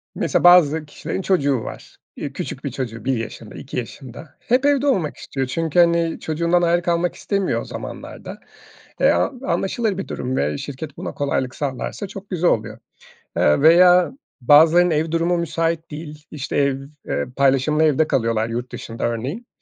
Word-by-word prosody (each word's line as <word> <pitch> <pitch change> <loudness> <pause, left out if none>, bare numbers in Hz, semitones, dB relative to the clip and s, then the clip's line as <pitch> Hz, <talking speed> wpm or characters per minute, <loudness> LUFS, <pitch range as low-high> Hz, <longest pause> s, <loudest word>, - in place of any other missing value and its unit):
mesela, - - 0
bazı 160 -3 +6
kişilerin 150 +5 -5
çocuğu 145 -9 +1
var. - - -10 0.2
Eee, - - -6
küçük - - -6
bir - - -3
çocuğu 115 -3 -5
1 135 -1 +1
yaşında, 115 -1 -7
2 135 - -8
yaşında 130 +4 -8
hep 255 +3 +1
evde 285 -1 +3
olmak 185 - 0
istiyor. 135 -1 -4
Çünkü, 165 +5 0
hani, 170 -1 +3
çocuğundan 170 +2 +1
ayrı 175 0 +2
kalmak 170 0 0
istemiyor 200 -2 -1
o - - -8
zamanlarda. - - -8 0.6
Eee, - - +5
an 255 -4 0
anlaşılır 195 +4 -1
bir 195 - -5
durum 130 +1 -3
ve 75 +1 -1
şirket 145 +2 -7
buna - - -5
kolaylık 130 -2 -1
sağlarsa 140 - -4
çok 195 +1 -10
güzel 180 -2 +2
oluyor. 110 0 -2 0.6
Eee, 75 - +3
veya 180 +2 +6 0.3
bazılarının 160 +7 +6
ev 160 0 0
durumu 170 +2 +1
müsait 165 0 -2
değil, 150 0 -9
işte, 150 0 -5
ev 140 -2 +2 0.3
eee, 70 - -1
paylaşımlı 140 +3 +2
evde 155 0 +3
kalıyorlar 115 -2 0
yurt 120 +2 -5
dışında 115 0 -6
örneğin. 130 - -4
155 Hz, 165 wpm, -21 LUFS, 130-175 Hz, 0.6 s, bazı